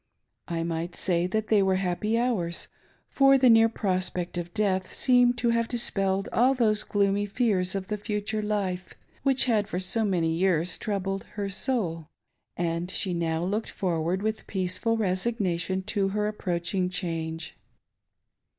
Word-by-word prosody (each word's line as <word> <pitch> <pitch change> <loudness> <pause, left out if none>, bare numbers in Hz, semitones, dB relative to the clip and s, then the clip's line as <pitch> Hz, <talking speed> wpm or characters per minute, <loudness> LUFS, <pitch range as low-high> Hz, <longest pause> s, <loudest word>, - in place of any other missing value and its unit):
I 165 -2 -2
might 170 +1 -3
say 175 -2 +1
that 220 +3 -2
they 215 -2 +5
were 190 -1 +2
happy 195 +4 0
hours; 215 -9 -1 0.4
for 275 0 +5
the 255 -2 +6
near 225 0 +6
prospect 185 -4 -2
of 175 0 -4
death 190 -3 0
seemed 245 -1 +4
to 240 - +1
have 230 0 +1
dispelled 195 -5 0
ill 255 +3 +4
those 215 -4 +2
gloomy 200 0 +1
fears 200 -4 0
of 195 -1 -2
the 210 - -2
future 210 0 -2
life, 195 -4 -2 0.3
which 270 -2 +3
had 215 -5 +1
for 180 - -3
so 190 +5 0
many 170 -5 +1
years 175 -1 +1
troubled 195 -2 -2
her 200 -1 -2
soul; 185 - -1 0.5
and 170 +1 -1
she 190 -1 -1
now 165 -1 -1
looked 205 +5 -2
forward 175 0 -1
with 220 0 -2
peaceful 190 +4 0
resignation 190 -2 -1
to 200 -1 0
her 210 +2 -1
approach 180 -5 -3
ingchange. 165 -4 -2
195 Hz, 150 wpm, -27 LUFS, 180-220 Hz, 0.5 s, the